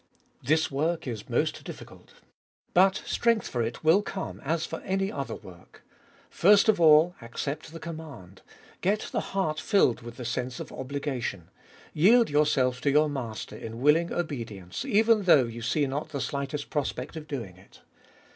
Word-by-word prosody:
1. - - -18
This 155 +1 +2
work 160 +5 -1
is 115 -5 -6
most - - 0
difficult. - - -11 0.6
But 190 +3 +4
strength 230 -2 +1
for 120 - -2
it 115 +5 -4
will 165 +6 +5
come 195 -2 -6
as 160 +3 -1
for 165 - -6
any 195 +1 -1
other 135 -5 -4
work. 90 -2 -15 0.4
First 200 +4 +5
of 215 -5 +3
all, 160 +2 +6
accept 140 +7 -5
the 165 - -8
command; 145 - -9 0.4
get 205 +3 0
the - - 0 0.2
heart 155 -5 0
filed 145 - +2
with 120 0 -10
the 125 - -6
sense 125 +2 -3
of - - -7
obligation; 130 - -4 0.4
yield 225 +6 +5
yourself 135 -4 +2
to 140 - +1
your 150 +2 +4
Master 125 -6 -5
in 115 +1 -7
willing 155 +6 +3
obedience, 115 - -4
even 225 -3 +4
though 155 -7 +6
you 115 0 -7
see 145 +5 +1
not 140 +3 -4
the 140 - -4
slightest 140 +2 -4
prospect 145 -1 -3
of 155 -1 -7
doing 115 -11 -5
it. 95 - -19
145 Hz, 165 wpm, -27 LUFS, 125-170 Hz, 0.6 s, all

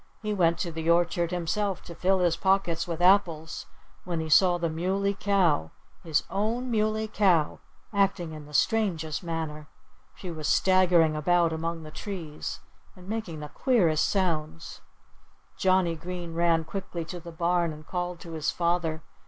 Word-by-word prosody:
He 210 0 -1
went 170 -4 +2
to 170 - -3
the 160 0 -3
orchard 170 0 +2
himself 185 +2 -2
to 170 - -9
fill 185 +2 +1
his 175 -2 +3
pockets 190 -3 +1
with 170 0 -3
apples, 170 -5 +2 0.4
when 175 -2 -3
he 160 0 -3
saw 175 +2 +5
the 170 -1 -1
Muley 190 +5 0
Cow 190 - +1 0.3
his 160 -3 +1
own 230 +6 -1
Muley 215 0 +1
Cow 185 -8 +2 0.3
acting 195 -4 +1
in 155 -2 -9
the 150 - -14
strangest 165 -9 +1
manner. 160 -3 -4 0.5
She 180 - -7
was 155 -2 -4
staggering 180 -4 +4
about 170 +2 +2
among 165 0 -3
the 155 - -10
trees 165 -5 -6 0.3
and 180 0 -14
making 200 -8 -4
the 150 - -7
queerest 175 - +2
sounds. 165 -4 -2 0.7
Johnnie 185 -3 +2
Green 175 0 -6
ran 165 -1 +2
quickly 175 -1 -5
to 175 +2 -7
the 170 0 -10
barn 170 0 +1
and 155 0 -11
called 180 0 -3
to 170 - -9
his 160 -2 -1
father. 170 -2 0
170 Hz, 160 wpm, -27 LUFS, 160-190 Hz, 0.7 s, saw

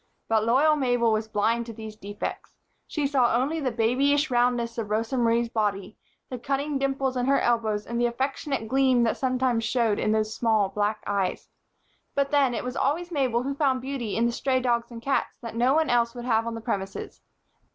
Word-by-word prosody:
But 220 -1 +2
loyal 280 +7 +4
Mabel 245 -5 +2
was 215 0 0
blind 230 +3 0
to 230 - -7
these 220 -1 -8
defects. 205 0 -6 0.3
She 300 -2 -2
saw 260 -4 +2
only 280 +7 0
the 275 -4 0
babyish 265 +6 +1
roundness 240 -1 +1
of 215 -2 -4
Rosa 225 +4 -1
Marie's 235 -1 +2
body, 210 -3 -2 0.3
the 255 - -6
cunning 275 +3 -2
dimples 270 -1 -1
in 250 0 -1
her 275 - +4
elbows 220 -3 0
and 235 +1 -2
the 240 - +3
affectionate 265 0 -2
gleam 260 -1 +3
that 230 - +1
sometimes 255 -3 0
showed 230 -3 +1
in 215 - +1
the 215 0 +2
small 220 -2 +1
black 210 +2 -1
eyes. 200 -2 -2 0.7
But 280 0 +1
then, 275 -4 +3
it - - -3
was 250 0 -5
always 340 +6 -1
Mabel 255 -6 0
who 275 +2 -2
found 275 -3 +1
beauty 260 -6 -3
in 230 - +2
the 235 - +1
stray 260 +2 0
dogs 235 -2 0
and 230 -1 -10
cats 275 - -1
that 230 - -7
no 245 +4 +2
one 315 -3 +2
else 235 0 +2
would 240 0 -6
have 230 -2 +1
on 230 - -3
the 225 - -6
premises. 195 -4 -4
240 Hz, 205 wpm, -26 LUFS, 225-270 Hz, 0.7 s, loyal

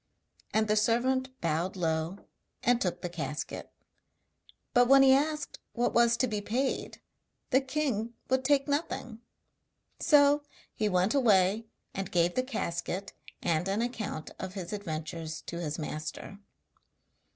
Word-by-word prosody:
And 220 0 +2
the 215 - +3
servant 260 +4 +1
bowed 170 +3 0
low, 165 +2 -2 0.4
and 245 0 +3
took 180 - -1
the - - 0
casket; 150 -4 -5 1.0
but 245 0 +5
when 275 +1 +8
he 265 -1 +7
asked 300 +1 0
what 240 0 0
was 235 0 +4
to 255 - +2
be 210 -3 -2
paid, 250 +6 -2 0.5
the 260 +1 +5
king 260 -5 -2
would 260 0 +1
take 275 +1 +3
nothing. 280 -6 -2 0.8
So 290 -1 +5 0.3
he 215 -1 0
went 185 +2 +2
away 215 -4 +3 0.3
and 195 -1 -4
gave 175 0 +2
the 255 - +2
casket 195 -6 -3 0.3
and 170 +1 +1
an 200 +4 0
account 220 -10 -4
of 190 0 -6
his 185 0 -5
adventures 160 -4 -4
to 170 - -6
his 155 -3 -3
master. 155 +5 -6
215 Hz, 140 wpm, -30 LUFS, 175-260 Hz, 1.0 s, when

